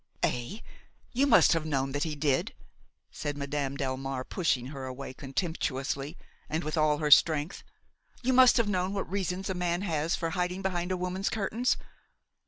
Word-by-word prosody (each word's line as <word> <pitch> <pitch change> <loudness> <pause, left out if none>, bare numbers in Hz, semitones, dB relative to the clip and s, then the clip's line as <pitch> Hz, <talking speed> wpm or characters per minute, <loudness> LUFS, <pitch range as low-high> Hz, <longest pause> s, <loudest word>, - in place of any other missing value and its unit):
""Eh! 145 - -1 0.5
you 270 +3 +2
must - - +6
have 165 -2 0
known 135 -3 -1
that 145 +1 -2
he 155 -2 -3
did!" 145 -2 0 0.6
said 145 -1 -4
Madame 140 -1 -2
Delmare, 135 -1 -3
pushing 150 -9 0
her 135 -2 -6
away 130 +1 -6
contemptuously 140 0 -3 0.3
and 160 +2 -1
with 155 +2 -2
all 155 -2 +3
her 150 -1 -1
strength; 155 +2 +5 0.6
"you 260 +1 +2
must 255 0 +7
have 230 -3 +3
known 185 -1 0
what 195 - -2
reasons 190 0 -2
a 190 - -1
man 175 0 -1
has 165 -3 0
for 165 -1 -2
hiding 180 +2 -2
behind 180 -1 -1
a 185 - 0
woman's 180 +2 -2
curtains. 220 +4 0
160 Hz, 170 wpm, -29 LUFS, 140-185 Hz, 0.6 s, must